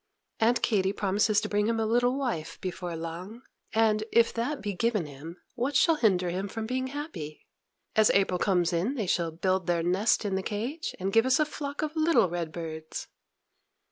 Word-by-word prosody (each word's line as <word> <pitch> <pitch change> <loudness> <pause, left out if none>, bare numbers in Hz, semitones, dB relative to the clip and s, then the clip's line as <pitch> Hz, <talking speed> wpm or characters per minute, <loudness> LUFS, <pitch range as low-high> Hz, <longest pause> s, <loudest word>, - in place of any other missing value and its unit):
Aunt 235 +2 +2
Katy 195 -3 +2
promises 205 +1 +2
to 215 - -3
bring 210 0 +1
him 230 0 0
a 220 - +1
little 245 +3 +2
wife 235 - -3
before 180 -2 -4
long; 175 +9 -7 0.3
and, 215 -1 +2
if 230 0 +4
that 265 +5 -2
be 205 -1 -3
given 215 -2 0
him, 150 +4 -9 0.2
what 260 +3 -2
shall 330 - +5
hinder 185 -8 +2
him 190 +3 -2
from 220 +2 -5
being 255 +2 -2
happy? 260 - -7 0.5
As 215 -1 +5
April 190 -2 +2
comes 180 -3 +2
in, 190 +11 0
they 220 -6 -1
shall 170 -2 +1
build 185 +2 -1
their 170 -1 +1
nest 195 +6 +2
in 200 - -1
the 190 - 0
cage, 235 - -4
and 195 +1 -2
give 225 +3 +4
us 260 +2 +4
a 305 - +4
flock 290 -1 -5
of 310 +1 -3
little 310 - +4
red 170 -2 -3
birds. 160 -1 -6
210 Hz, 195 wpm, -28 LUFS, 180-240 Hz, 0.5 s, shall